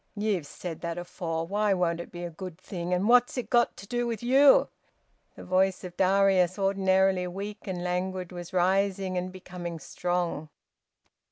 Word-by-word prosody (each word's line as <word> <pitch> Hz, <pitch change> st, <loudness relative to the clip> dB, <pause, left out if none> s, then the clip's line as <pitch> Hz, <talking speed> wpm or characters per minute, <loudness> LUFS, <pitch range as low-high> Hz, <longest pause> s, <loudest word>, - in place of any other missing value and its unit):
"Ye've 205 Hz, -7 st, -1 dB
said 165 Hz, +2 st, -7 dB
that 170 Hz, 0 st, -4 dB
afore. 170 Hz, -2 st, -4 dB
Why 205 Hz, +2 st, +1 dB
won't 170 Hz, -2 st, 0 dB
it 170 Hz, -, -8 dB
be 175 Hz, -1 st, -7 dB
a 175 Hz, -, -5 dB
good 180 Hz, 0 st, -8 dB
thing? 180 Hz, -2 st, -6 dB
And 180 Hz, +3 st, +1 dB
what's 245 Hz, +2 st, +4 dB
it 250 Hz, -, -4 dB
got 240 Hz, -1 st, +3 dB
to 200 Hz, -, -11 dB
do 240 Hz, +1 st, -1 dB
with 230 Hz, -1 st, -4 dB
you?" 270 Hz, +3 st, +6 dB, 0.7 s
The -, -, -10 dB
voice 185 Hz, +1 st, +1 dB
of 180 Hz, -1 st, -8 dB
Darius, 190 Hz, -1 st, +3 dB
ordinarily 190 Hz, -1 st, +2 dB
weak 200 Hz, +4 st, -7 dB
and 180 Hz, -2 st, -3 dB
languid, 180 Hz, 0 st, -2 dB
was 175 Hz, -1 st, -8 dB
rising 190 Hz, +1 st, +1 dB
and 180 Hz, +1 st, -2 dB
becoming 175 Hz, -2 st, -7 dB
strong. 170 Hz, 0 st, -2 dB
185 Hz, 170 wpm, -28 LUFS, 175-195 Hz, 0.7 s, you